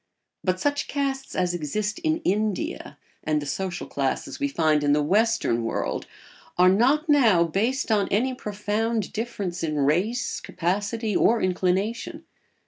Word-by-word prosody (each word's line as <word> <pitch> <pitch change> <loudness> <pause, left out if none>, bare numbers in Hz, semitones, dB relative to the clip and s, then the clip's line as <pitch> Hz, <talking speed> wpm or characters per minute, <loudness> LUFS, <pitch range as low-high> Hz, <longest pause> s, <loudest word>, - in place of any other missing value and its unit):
But 185 -1 0
such 285 +4 0
castes 270 -1 -3
as 180 -1 +1
exist 205 - -2
in 320 -1 0
India, 210 +1 -1 0.3
and 155 -1 +1
the 145 - -6
social 175 +5 -3
classes 135 - -3
we 285 - +1
find 155 - +2
in 145 0 +3
the 150 0 +2
western 205 - +2
world, 115 - -2 0.5
are 180 +1 +6
not 265 - +3
now 235 - +5
based 225 - 0
on 205 -2 +3
any 255 +6 +1
profound 210 -1 -2
difference 205 -6 -4
in 155 -2 -1
race, 180 - 0
capacity, 205 +4 -2
or 230 0 +4
inclination. 185 +4 -1
205 Hz, 140 wpm, -25 LUFS, 175-235 Hz, 0.5 s, are